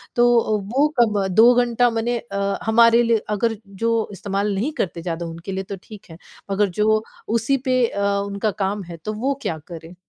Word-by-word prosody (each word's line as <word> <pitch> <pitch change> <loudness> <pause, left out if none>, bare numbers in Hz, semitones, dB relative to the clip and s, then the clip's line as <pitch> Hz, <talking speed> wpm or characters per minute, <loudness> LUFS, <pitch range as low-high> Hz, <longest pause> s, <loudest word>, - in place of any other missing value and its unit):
तो 240 -3 +3 0.2
वो 285 +3 +4
कब 210 -4 +3
2 235 +3 +7
घंटा 245 0 +3
माने 235 +1 -1
अ, 200 -3 -3
हमारे 230 +1 +5
लिए 230 -2 +2
अगर 225 +2 0
जो 230 +4 -1 0.2
इस्तेमाल 200 +1 -2
नहीं 235 +10 -1
करते 170 -2 -2
ज़्यादा 170 0 -4
उनके 165 +3 -7
लिए 190 0 -3
तो 195 - -6
ठीक 210 -2 -12
है 160 - -11 0.3
मगर 200 +1 +2
जो 215 0 +3 0.2
उसी 230 +5 +1
पे 255 -1 +3
अ, 200 - -4 0.2
उनका 200 +2 -2
काम 200 +1 -2
है, 170 -1 -9
तो 210 +7 -5
वो 260 +6 0
क्या 160 - -2
करें? 170 0 -10
215 Hz, 190 wpm, -21 LUFS, 195-235 Hz, 0.3 s, 2